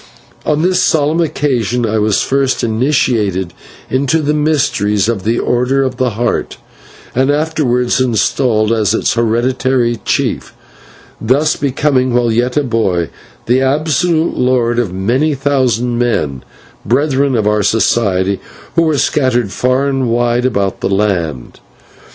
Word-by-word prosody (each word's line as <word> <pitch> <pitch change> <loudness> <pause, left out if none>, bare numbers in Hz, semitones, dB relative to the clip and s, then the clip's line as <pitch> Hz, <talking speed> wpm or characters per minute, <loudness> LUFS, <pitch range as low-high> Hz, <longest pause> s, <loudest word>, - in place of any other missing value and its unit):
On 150 +1 +1
this 185 +1 +2
solemn 155 +2 +1
occasion 125 -7 -1
I 110 0 0
was 105 -1 +1
first 135 -1 0
initiated 110 - 0 0.3
into 140 +5 0
the 150 +1 +1
mysteries 135 -10 +1
of 115 -5 -2
the 115 +2 +1
Order 125 +3 +1
of 130 -2 -3
the 125 -4 -1
Heart, 120 - -2 0.6
and 130 +2 +1
afterwards 145 -5 0
installed 115 -2 +1
as 110 -1 +1
its - - 0
hereditary 120 +1 0
chief, - - -2 0.7
thus 135 +7 +2
becoming, 135 -2 0
while 120 -1 +2
yet 120 +4 0
a 145 - +2
boy, 100 - -1 0.3
the 125 +3 +2
absolute 155 +4 +1
lord 120 -2 +1
of 120 -5 0
a - - -10
many 125 +11 0
thousand 125 -4 0
men, 75 - -1 0.4
brethren 140 +1 +1
of 110 -3 0
our 105 0 +2
Society, 100 -3 +1 0.4
who 170 - +4
were 160 -3 +1
scattered 125 -7 +1
far 130 +4 0
and 135 -3 -1
wide 120 +1 +1
about 100 -6 -2
the - - -1
land. 90 -10 -2
125 Hz, 140 wpm, -14 LUFS, 110-140 Hz, 0.7 s, who